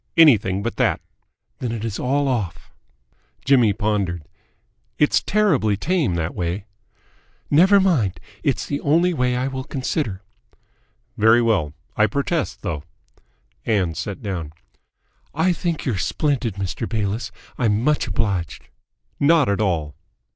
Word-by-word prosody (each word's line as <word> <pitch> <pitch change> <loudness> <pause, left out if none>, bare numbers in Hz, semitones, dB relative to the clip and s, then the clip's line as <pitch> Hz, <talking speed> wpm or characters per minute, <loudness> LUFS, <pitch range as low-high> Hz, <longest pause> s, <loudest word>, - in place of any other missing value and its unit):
"Anything 105 - +5
but 115 - -3
that." - - +2 0.6
"Then 120 - -3
it 115 -1 -4
is 110 -4 -4
all 140 +3 +1
off!" 110 -11 -3 0.7
Jimmy 125 -6 +5
pondered. 100 -5 -1 0.7
"It's 150 - +3
terribly 155 - +2
tame 155 - 0
that 85 0 -2
way." 90 +3 -3 0.9
"Never 190 +7 +6
mind. 135 - +1 0.2
It's 140 - 0
the 140 - -3
only 170 +5 +3
way 125 -4 +1
I 125 +2 0
will 130 -1 -4
consider." 130 - -3 0.9
"Very 110 +2 +5
well. 100 -11 +1 0.2
I 110 - +4
protest, 140 - -2
though." 80 -8 -3 0.8
Ann 95 -7 +1
sat 95 - -5
down. 85 -7 -4 0.8
"I 170 +4 +2
think 170 -2 -3
you're 110 -8 -1
splendid, 135 - -1
Mr. 100 +3 -4
Bayliss. 105 -1 -2 0.3
I'm 110 -2 +1
much 150 -1 +1
obliged!" 100 -5 -2 0.5
"Not 150 -2 +4
at 100 +1 0
all." 80 -7 0
115 Hz, 130 wpm, -22 LUFS, 95-140 Hz, 0.9 s, Never